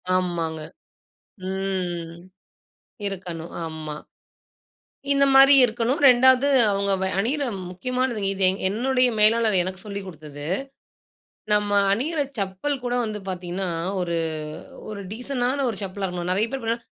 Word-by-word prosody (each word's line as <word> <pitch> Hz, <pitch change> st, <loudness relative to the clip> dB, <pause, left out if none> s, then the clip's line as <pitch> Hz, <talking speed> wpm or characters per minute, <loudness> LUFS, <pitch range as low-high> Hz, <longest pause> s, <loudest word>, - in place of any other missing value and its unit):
ஆமாங்க. 165 Hz, -3 st, -1 dB, 0.9 s
ம். 180 Hz, -3 st, -3 dB, 0.9 s
இருக்கணும். 175 Hz, -4 st, -6 dB
ஆமா. 155 Hz, -2 st, -6 dB, 1.2 s
இந்த 275 Hz, 0 st, +4 dB
மாரி 270 Hz, +1 st, +8 dB
இருக்கணும். 235 Hz, +3 st, -1 dB
ரெண்டாவது, 260 Hz, +2 st, +5 dB, 0.2 s
அவுங்க 200 Hz, 0 st, +1 dB
வ -, -, +1 dB
அணிற 280 Hz, +7 st, 0 dB, 0.3 s
முக்கியமானது. 250 Hz, +4 st, -2 dB
இது, 195 Hz, 0 st, -5 dB
எங் 190 Hz, -, -3 dB
என்னுடைய 250 Hz, +4 st, +2 dB
மேலாளர் 215 Hz, -2 st, +4 dB
எனக்கு 185 Hz, +1 st, -6 dB
சொல்லி 200 Hz, -1 st, -5 dB
கொடுத்தது. 150 Hz, -3 st, -9 dB, 1.1 s
நாம்ம 205 Hz, -1 st, +2 dB, 0.2 s
அணிற 295 Hz, +8 st, -1 dB, 0.2 s
செப்பல் 205 Hz, +8 st, -2 dB
கூட 245 Hz, 0 st, -1 dB
வந்து 210 Hz, -1 st, -4 dB
பார்த்தீங்கனா, 180 Hz, +1 st, -4 dB, 0.3 s
ஒரு 170 Hz, -1 st, -1 dB, 0.7 s
ஒரு 205 Hz, -1 st, -6 dB
டீசென்ட்டான 255 Hz, +2 st, -1 dB
ஒரு 195 Hz, -, -8 dB
செப்பலா 195 Hz, +1 st, -4 dB
இருக்கணும். 180 Hz, 0 st, -3 dB
நிறைய 210 Hz, +5 st, +1 dB
பேர் 270 Hz, -3 st, -4 dB
பார்த்தா 230 Hz, +1 st, 0 dB
200 Hz, 120 wpm, -24 LUFS, 180-250 Hz, 1.2 s, மாரி